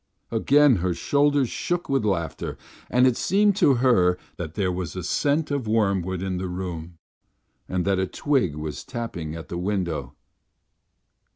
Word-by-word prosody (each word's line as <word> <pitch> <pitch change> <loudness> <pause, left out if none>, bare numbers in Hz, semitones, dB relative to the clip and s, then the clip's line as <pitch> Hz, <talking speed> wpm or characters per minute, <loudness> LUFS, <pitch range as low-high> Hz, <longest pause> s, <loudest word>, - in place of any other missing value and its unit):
Again 135 +2 +4
her 90 0 -1
shoulders 145 +7 +2
shook 175 +8 -2
with 135 -4 +1
laughter, 85 -8 -2 0.3
and 125 +1 +4
it 130 -2 +4
seemed 200 - +3
to 140 -9 +5
her 105 -8 +3 0.2
that 80 -2 -6
there 95 -3 0
was 90 -1 -4
a 90 - -4
scent 145 - 0
of 140 -5 -1
wormwood 95 -4 0
in 95 -1 -2
the 95 - -3
room 90 -2 -5 0.7
and 90 -1 -1
that 95 -1 +2
a 95 - 0
twig 130 - 0
was 75 -2 -5
tapping 85 -10 -5
at 80 - -8
the 85 - -4
window. 90 -9 -2
95 Hz, 160 wpm, -24 LUFS, 90-130 Hz, 0.7 s, to